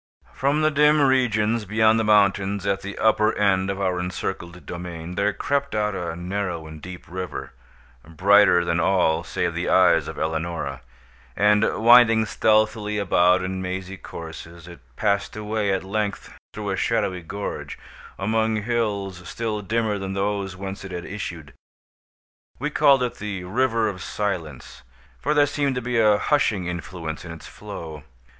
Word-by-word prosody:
From 145 Hz, +3 st, +1 dB
the 155 Hz, -, +3 dB
dim 150 Hz, +1 st, +4 dB
regions 115 Hz, -5 st, +2 dB
beyond 110 Hz, +2 st, +3 dB
the -, -, +1 dB
mountains 100 Hz, -2 st, +2 dB
at 100 Hz, -1 st, 0 dB
the 100 Hz, +1 st, -7 dB
upper 110 Hz, 0 st, +2 dB
end 95 Hz, -2 st, +2 dB
of 100 Hz, 0 st, -3 dB
our 90 Hz, -2 st, 0 dB
encircled 90 Hz, -1 st, -5 dB
domain, 85 Hz, -1 st, -7 dB
there 100 Hz, +3 st, +1 dB
crept 140 Hz, +3 st, -2 dB
out 105 Hz, -1 st, 0 dB
a 90 Hz, -3 st, -4 dB
narrow 90 Hz, -2 st, -3 dB
and 80 Hz, 0 st, -10 dB
deep 90 Hz, +1 st, -9 dB
river, 90 Hz, -7 st, -6 dB, 0.5 s
brighter 90 Hz, +1 st, +4 dB
than 85 Hz, 0 st, 0 dB
all 90 Hz, -4 st, +2 dB
save -, -, -2 dB
the -, -, -2 dB
eyes -, -, +4 dB
of -, -, -7 dB
Eleonora; 80 Hz, -4 st, -3 dB, 0.5 s
and, 105 Hz, +1 st, +4 dB, 0.2 s
winding 115 Hz, -1 st, +6 dB
stealthily 110 Hz, -1 st, +1 dB
about 90 Hz, -2 st, +3 dB
in 95 Hz, 0 st, -3 dB
mazy 95 Hz, +1 st, -4 dB
courses, 85 Hz, -1 st, -10 dB
it 85 Hz, -3 st, -11 dB, 0.2 s
passed 100 Hz, +2 st, 0 dB
away, 105 Hz, -1 st, -1 dB
at 95 Hz, -1 st, -1 dB
length, 100 Hz, +1 st, -3 dB, 0.2 s
through -, -, -3 dB
a -, -, 0 dB
shadowy 90 Hz, -1 st, 0 dB
gorge, 100 Hz, +5 st, -6 dB, 0.4 s
among 110 Hz, +2 st, 0 dB
hills 100 Hz, -6 st, -2 dB
still 110 Hz, -2 st, -3 dB
dimmer 110 Hz, 0 st, -1 dB
than 95 Hz, 0 st, -4 dB
those 100 Hz, -1 st, -2 dB
whence 95 Hz, +1 st, -6 dB
it 95 Hz, -, -8 dB
had 90 Hz, -1 st, -5 dB
issued. 85 Hz, -7 st, -7 dB, 1.0 s
We -, -, -3 dB
called 135 Hz, -2 st, +4 dB
it 125 Hz, -, -3 dB
the 100 Hz, -3 st, -4 dB
"River 115 Hz, +3 st, +1 dB
of 95 Hz, -3 st, -5 dB
Silence"; 85 Hz, -14 st, -4 dB, 0.4 s
for 150 Hz, +1 st, 0 dB
there 145 Hz, -1 st, +5 dB
seemed 140 Hz, -1 st, -1 dB
to -, -, 0 dB
be 120 Hz, -1 st, 0 dB
a 105 Hz, -2 st, +5 dB
hushing 105 Hz, -9 st, +1 dB
influence 85 Hz, -2 st, -5 dB
in 85 Hz, -, -8 dB
its 80 Hz, -, -10 dB
flow. 80 Hz, -3 st, -9 dB
100 Hz, 160 wpm, -23 LUFS, 90-110 Hz, 1.0 s, winding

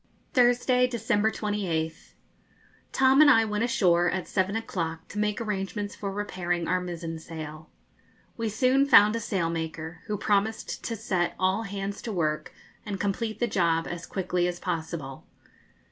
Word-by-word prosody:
Thursday, 250 Hz, -1 st, +4 dB
December 220 Hz, -3 st, +1 dB
28th. 185 Hz, -8 st, -3 dB, 0.8 s
Tom 265 Hz, +2 st, +5 dB
and 305 Hz, -, +8 dB
I 225 Hz, -5 st, +6 dB
went 210 Hz, 0 st, -1 dB
ashore 175 Hz, -7 st, +3 dB
at 185 Hz, 0 st, -3 dB
seven 190 Hz, +1 st, 0 dB
o'clock 165 Hz, -7 st, -3 dB
to 210 Hz, -, -5 dB
make 210 Hz, 0 st, 0 dB
arrangements 205 Hz, -1 st, -3 dB
for 200 Hz, -1 st, -4 dB
repairing 175 Hz, -4 st, -2 dB
our 185 Hz, 0 st, +1 dB
mizen 170 Hz, -2 st, -5 dB
sail. 155 Hz, -1 st, -8 dB, 0.7 s
We 230 Hz, -2 st, -2 dB
soon 255 Hz, +5 st, +3 dB
found 210 Hz, -5 st, +7 dB
a -, -, 0 dB
sailmaker, 165 Hz, -5 st, -3 dB
who 210 Hz, -1 st, -1 dB
promised 205 Hz, +2 st, 0 dB
to 230 Hz, -, -2 dB
set 190 Hz, -5 st, -1 dB
all 190 Hz, +3 st, +1 dB
hands 200 Hz, 0 st, -4 dB
to 230 Hz, -, -5 dB
work 155 Hz, -5 st, -1 dB, 0.3 s
and 200 Hz, -2 st, -5 dB
complete 215 Hz, +2 st, -2 dB
the 240 Hz, -, +2 dB
job 165 Hz, -5 st, +1 dB
as 175 Hz, 0 st, -6 dB
quickly 180 Hz, -2 st, 0 dB
as 175 Hz, 0 st, -4 dB
possible. 160 Hz, -5 st, -4 dB
195 Hz, 150 wpm, -27 LUFS, 170-220 Hz, 0.8 s, and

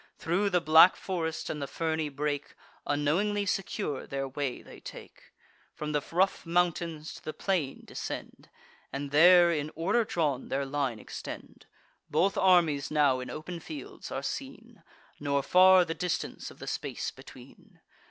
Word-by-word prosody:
Thro' 190 Hz, +5 st, 0 dB
the 180 Hz, -2 st, +3 dB
black 160 Hz, +2 st, +7 dB
forest 165 Hz, -4 st, -3 dB
and 150 Hz, -, -4 dB
the 140 Hz, -, -3 dB
ferny 160 Hz, 0 st, -2 dB
brake, 145 Hz, 0 st, -3 dB, 0.3 s
Unknowingly 180 Hz, +9 st, +1 dB
secure, 185 Hz, -7 st, -2 dB
their 135 Hz, 0 st, -3 dB
way 135 Hz, -1 st, -4 dB
they -, -, -13 dB
take; -, -, -12 dB, 0.4 s
From 150 Hz, 0 st, -4 dB
the 150 Hz, -1 st, +1 dB
rough 185 Hz, +3 st, +2 dB
mountains 170 Hz, -2 st, -1 dB
to -, -, -12 dB
the 155 Hz, -, -5 dB
plain 170 Hz, -9 st, -1 dB
descend, -, -, -7 dB, 0.4 s
And 140 Hz, +1 st, -4 dB
there, 175 Hz, +3 st, +7 dB
in 150 Hz, -2 st, -1 dB
order 200 Hz, +9 st, +2 dB
drawn, 150 Hz, -, -1 dB
their 140 Hz, +1 st, -1 dB
line 135 Hz, -4 st, -1 dB
extend. -, -, -9 dB, 0.4 s
Both 185 Hz, +7 st, +2 dB
armies 175 Hz, -8 st, +3 dB
now 145 Hz, -4 st, +3 dB
in 125 Hz, -, -6 dB
open 170 Hz, +3 st, -6 dB
fields 155 Hz, -4 st, -9 dB
are -, -, -3 dB
seen; -, -, -6 dB, 0.4 s
Nor 140 Hz, -1 st, 0 dB
far 185 Hz, +2 st, +6 dB
the 165 Hz, -, -3 dB
distance 170 Hz, +2 st, -3 dB
of -, -, -14 dB
the -, -, -8 dB
space -, -, -3 dB
between. -, -, -15 dB
160 Hz, 150 wpm, -29 LUFS, 145-180 Hz, 0.4 s, black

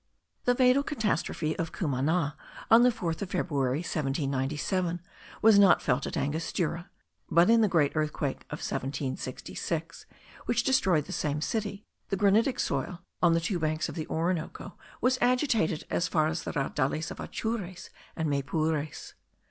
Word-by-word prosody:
The 245 Hz, -, +3 dB
fatal 255 Hz, +2 st, +5 dB
catastrophe 215 Hz, -, -1 dB
of 165 Hz, -, -2 dB
Cumana, 150 Hz, 0 st, 0 dB, 0.4 s
on 225 Hz, +1 st, +9 dB
the 250 Hz, -, +6 dB
4th 170 Hz, -9 st, -3 dB
of 200 Hz, -, -3 dB
February, 145 Hz, -6 st, 0 dB
1797, 150 Hz, +4 st, -1 dB, 0.4 s
was 220 Hz, -2 st, +7 dB
not 195 Hz, -3 st, +7 dB
felt 125 Hz, -3 st, 0 dB
at -, -, -4 dB
Angostura; 165 Hz, +4 st, -2 dB, 0.4 s
but 175 Hz, +5 st, +5 dB
in 230 Hz, 0 st, +6 dB
the 215 Hz, -, +4 dB
great 155 Hz, -7 st, +3 dB
earthquake 150 Hz, -2 st, -1 dB
of -, -, -6 dB
1766, 140 Hz, +4 st, -4 dB, 0.4 s
which -, -, +2 dB
destroyed 190 Hz, -, +3 dB
the -, -, -9 dB
same 150 Hz, 0 st, -1 dB
city, 205 Hz, +4 st, -3 dB, 0.2 s
the 195 Hz, -, 0 dB
granitic 210 Hz, +6 st, +3 dB
soil 170 Hz, +6 st, -2 dB, 0.2 s
of 175 Hz, -2 st, +5 dB
the -, -, +3 dB
two 175 Hz, +2 st, -2 dB
banks 155 Hz, 0 st, -1 dB
of -, -, -6 dB
the 160 Hz, -3 st, -5 dB
Orinoco 165 Hz, 0 st, -2 dB, 0.3 s
was 255 Hz, 0 st, +2 dB
agitated 245 Hz, -, +2 dB
as 170 Hz, -, +1 dB
far 155 Hz, -2 st, +2 dB
as 160 Hz, +2 st, -2 dB
the -, -, -4 dB
Raudales 145 Hz, +1 st, -1 dB
of -, -, -8 dB
Atures 205 Hz, -6 st, -4 dB, 0.2 s
and 160 Hz, -1 st, -1 dB
Maypures. 150 Hz, +1 st, -2 dB
165 Hz, 150 wpm, -29 LUFS, 150-200 Hz, 0.4 s, on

